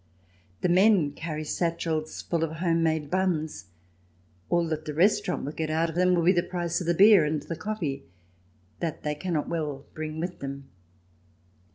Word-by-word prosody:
The - - +2
men 185 -3 +4
carry 155 +1 -5
satchels 165 -1 -2
full 170 -2 -1
of 160 -1 -2
home 165 0 +1
made 160 -2 0
buns; 170 - -1 0.8
all 175 -1 +2
that 155 -1 -3
the 150 -2 -5
restaurant 185 -1 +2
will 145 - -3
get 155 0 -3
out 160 +2 +1
of - - -12
them 180 0 +3
will 170 - +1
be 175 - +6
the 175 -2 +3
price 175 -1 -2
of 170 - -5
the 170 - +2
beer 200 -1 +7
and 150 0 0
the 165 - -5
coffee, 160 -9 -4 0.7
that 165 -3 -3
they 150 - -1
cannot 155 -1 -2
well 150 -4 -3
bring 155 0 -5
with 175 +2 -4
them. 140 0 -7
165 Hz, 180 wpm, -27 LUFS, 155-175 Hz, 0.8 s, beer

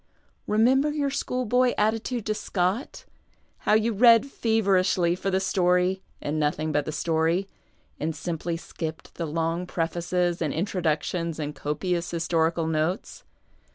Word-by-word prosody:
Remember 255 +7 +3
your 290 -2 -1
school 255 -2 -2
boy 250 +2 +2
attitude 220 +2 0
to 215 - 0
Scott; 195 - -2 0.6
how - - +6
you 220 +1 +2
read 230 +2 +6
feverishly 195 -8 +2
for 195 - -2
the 190 0 +1
story 185 0 +2 0.2
and 150 +2 -2
nothing 155 +1 0
but 145 -1 0
the - - -3
story, 165 +4 0 0.5
and 160 +1 -2
simply 170 -1 -3
skipped 160 -1 -7
the 170 - -4
long 165 +3 -1
prefaces 175 +1 -1
and 155 -3 -1
introductions 170 -2 -1
and 150 -1 -4
copious 170 +5 -2
historical 165 -1 0
notes 160 +4 -2
180 Hz, 135 wpm, -26 LUFS, 165-215 Hz, 0.6 s, how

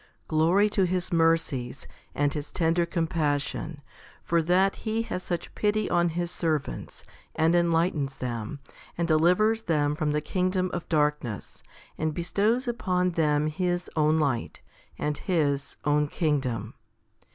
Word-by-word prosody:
Glory 170 +6 +3
to 200 -3 +1
His 180 0 -2
mercies 165 -6 +1 0.3
and 145 -1 +1
His 150 -1 -5
tender 170 0 +1
compassion, 160 -3 -1 0.4
for 170 0 +2
that 185 +4 +2
He 225 0 -1
has 185 - -4
such 175 -2 -4
pity 210 0 +1
on 175 0 +3
His 170 +1 -3
servants, 155 - -3 0.3
and 165 +2 +3
enlightens 165 -5 +1
them, 120 +2 -4 0.4
and 170 0 0
delivers 180 +8 +3
them 150 -7 +1
from 150 0 -1
the 150 - +1
kingdom 185 +3 0
of 175 - -4
darkness, 150 - -1 0.4
and 155 -1 -1
bestows 210 - +1
upon 185 -6 0
them 150 -3 +2
His 175 +3 -1
own 155 0 +3
light 135 -6 -1 0.4
and 150 0 -1
His 145 -6 0
own 150 0 +3
kingdom. 130 - -1
165 Hz, 135 wpm, -27 LUFS, 150-180 Hz, 0.4 s, Glory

